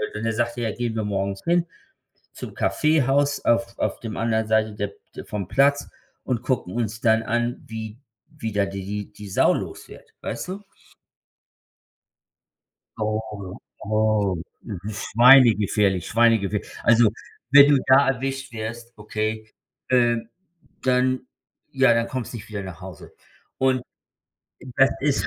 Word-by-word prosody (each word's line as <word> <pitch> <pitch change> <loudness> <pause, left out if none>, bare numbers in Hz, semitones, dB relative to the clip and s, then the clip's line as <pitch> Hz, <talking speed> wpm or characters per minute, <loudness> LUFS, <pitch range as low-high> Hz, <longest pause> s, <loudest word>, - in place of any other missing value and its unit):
Und 105 - -4
dann 115 - 0
sagt 120 +1 -1
er: 115 -2 -1
„Gehen 120 -2 -3
wir 110 - -1
morgens 100 -1 -3
hin 170 0 +2 0.7
zum - - -8
Kaffeehaus 145 -2 +1
auf 115 0 +1
auf - - -2
dem 110 -2 -6
anderen 110 -1 0
Seite 110 0 +2
der 105 -1 -4 0.2
d - - -7
vom 100 -3 -5
Platz 140 +3 +2 0.4
und 120 -3 -2
gucken 130 -8 -2
uns 110 -2 -3
dann 110 -1 +3
an, 120 +1 -2
wie 110 0 -7 0.4
wie 110 -5 -4
da 100 -1 +1
die 95 -1 -6
die 105 +1 -5
die 105 -1 -10
Sau - - +3
los - - -6
wird“, - - -15
weißt - - -5
du? 195 +3 -6 2.3
Oh. 110 -3 -4 0.3
Oh, 110 -2 +1 0.5
schweine-gefährlich, 105 -4 +4
schweine-gefährlich. 110 -3 +2 0.2
Also, 120 -1 +5 0.4
wenn 140 0 +8
du 145 -1 +5
da 135 +1 +5
erwischt 135 +1 -4
wirst, 115 +1 -6
okay, 110 +1 -4 0.4
äh, 120 -2 +3 0.6
dann 130 0 +1 0.5
ja 130 -3 +4
dann 115 0 +1
kommst 130 -3 -5
du - - -5
nicht 110 - -10
wieder 105 -2 -5
nach 95 -3 -9
Hause. 90 -4 -11 0.5
Und 130 -1 +2 0.9
das 135 - +5
ist 145 -1 +1
115 Hz, 140 wpm, -23 LUFS, 105-130 Hz, 2.3 s, wenn